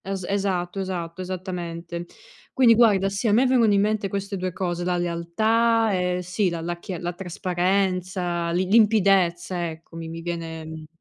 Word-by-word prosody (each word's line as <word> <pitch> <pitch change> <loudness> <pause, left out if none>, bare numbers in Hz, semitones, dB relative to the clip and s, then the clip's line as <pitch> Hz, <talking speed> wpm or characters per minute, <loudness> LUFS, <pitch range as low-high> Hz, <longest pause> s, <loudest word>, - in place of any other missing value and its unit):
Es-esatto, 190 -1 -2
esatto, 185 -2 -4
esattamente. 175 -2 -5 0.5
Quindi 245 -3 +6
guarda 210 -4 +4
sì, 200 +4 -2
a - - +3
me 245 +5 +4
vengono 245 -4 +4
in 200 - +4
mente 210 -1 0
queste 200 +1 -3
2 185 -1 -3
cose, 175 -1 -3
la 180 0 0
lealtà 220 +7 +1
e 180 -1 0
sì, 180 +2 0
la 170 -1 -4
la 175 +1 -4
chi 185 0 -6
la 175 +1 -4
trasparenza, 180 -1 -1
lim 180 +2 0
limpidezza 190 -5 +3
ecco, 160 +1 -12
mi 165 -1 -6
mi 165 0 -7
viene 165 -2 -5
mi 160 0 -9
180 Hz, 165 wpm, -24 LUFS, 175-200 Hz, 0.5 s, Quindi